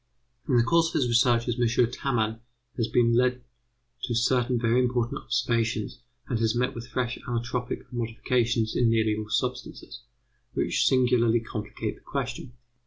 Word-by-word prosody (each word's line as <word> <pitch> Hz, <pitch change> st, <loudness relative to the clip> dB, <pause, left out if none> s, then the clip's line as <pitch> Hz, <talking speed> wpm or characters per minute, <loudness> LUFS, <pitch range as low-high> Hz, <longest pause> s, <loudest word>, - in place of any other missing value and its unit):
In 125 Hz, -, +4 dB
the 120 Hz, -, +5 dB
course 165 Hz, +5 st, +3 dB
of -, -, -7 dB
his 130 Hz, -, +1 dB
researches 120 Hz, 0 st, +2 dB
M. 120 Hz, 0 st, +2 dB
Tamman 115 Hz, -4 st, -1 dB, 0.4 s
has 115 Hz, -3 st, -1 dB
been 120 Hz, -1 st, +3 dB
led 125 Hz, +1 st, +2 dB, 0.6 s
to 120 Hz, -3 st, -2 dB
certain 125 Hz, +1 st, +2 dB
very 115 Hz, +1 st, +2 dB
important 125 Hz, -1 st, 0 dB
observations, 115 Hz, -2 st, -1 dB, 0.3 s
and 120 Hz, -4 st, -1 dB
has 115 Hz, 0 st, +1 dB
met 125 Hz, +1 st, 0 dB
with 115 Hz, +1 st, -8 dB
fresh 125 Hz, -2 st, -2 dB
allotropic 120 Hz, 0 st, -3 dB
modifications 120 Hz, -1 st, 0 dB
in 120 Hz, -2 st, +3 dB
nearly 110 Hz, -1 st, +2 dB
all 105 Hz, 0 st, -6 dB
substances, -, -, -3 dB, 0.6 s
which -, -, +1 dB
singularly 120 Hz, -3 st, +3 dB
complicate 110 Hz, -2 st, -5 dB
the -, -, -22 dB
question. 120 Hz, -, -5 dB
120 Hz, 150 wpm, -26 LUFS, 115-125 Hz, 0.6 s, the